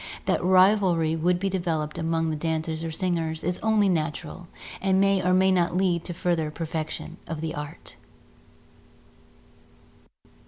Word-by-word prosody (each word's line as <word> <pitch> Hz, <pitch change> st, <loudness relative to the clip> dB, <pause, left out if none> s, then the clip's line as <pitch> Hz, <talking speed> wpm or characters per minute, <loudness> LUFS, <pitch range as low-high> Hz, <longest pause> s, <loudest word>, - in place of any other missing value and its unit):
That -, -, +1 dB
rivalry 185 Hz, -3 st, +4 dB
would 175 Hz, +2 st, +1 dB
be 195 Hz, -, -1 dB
developed 165 Hz, -5 st, -2 dB
among 165 Hz, 0 st, 0 dB
the -, -, -2 dB
dancers 160 Hz, +1 st, -2 dB
or 165 Hz, -, -3 dB
singers 160 Hz, -2 st, -2 dB
is 180 Hz, +2 st, -1 dB
only 220 Hz, -2 st, +2 dB
natural 170 Hz, +1 st, -2 dB, 0.3 s
and 190 Hz, 0 st, +2 dB
may 195 Hz, -1 st, +3 dB
or 180 Hz, -, +1 dB
may 190 Hz, +1 st, +4 dB
not 175 Hz, -1 st, +1 dB
lead 180 Hz, -3 st, +1 dB
to 175 Hz, -, -4 dB
further 170 Hz, -3 st, 0 dB
perfection 160 Hz, +1 st, -5 dB
of 160 Hz, -2 st, -4 dB
the 160 Hz, 0 st, -3 dB
art. 150 Hz, 0 st, -8 dB
170 Hz, 145 wpm, -25 LUFS, 160-185 Hz, 0.3 s, rivalry